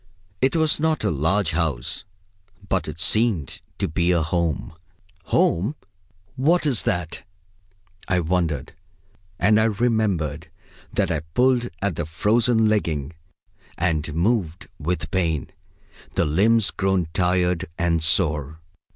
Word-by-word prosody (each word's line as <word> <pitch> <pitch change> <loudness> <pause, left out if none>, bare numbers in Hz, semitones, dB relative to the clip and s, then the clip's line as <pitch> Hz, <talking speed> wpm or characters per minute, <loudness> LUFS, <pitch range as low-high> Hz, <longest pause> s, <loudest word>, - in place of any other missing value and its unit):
It 130 +3 +2
was 160 -2 +2
not 160 -3 0
a 105 - +1
large 80 +5 +1
house, 80 -4 -2 0.6
but 95 -1 0
it 75 +1 -7
seemed 100 - +2 0.2
to 100 - -1
be 85 +1 +1
a 85 -3 +2
home. 85 -2 -1 0.5
Home! 100 - +1 0.6
what 155 +6 +2
is 130 -7 +2
that? 85 -2 -3 0.9
I 90 -1 +2
wondered; 85 -4 -1 0.6
and 105 +3 +4
I 110 - +3
remember 105 - 0 0.5
that - - 0
I 80 - 0
pulled 120 - +1
at 100 -5 -1
the 85 - -3
frozen 110 +6 +2
legging, 80 -9 -1 0.6
and 80 -3 -1
moved, 90 -2 0
with 85 +4 -3
pain, 85 -6 -1 0.6
the - - +2
limbs 105 +8 +3
grown 95 -3 0
tired 90 -1 +1
and 85 -3 +1
sore. 75 -2 +1
90 Hz, 125 wpm, -23 LUFS, 80-110 Hz, 0.9 s, and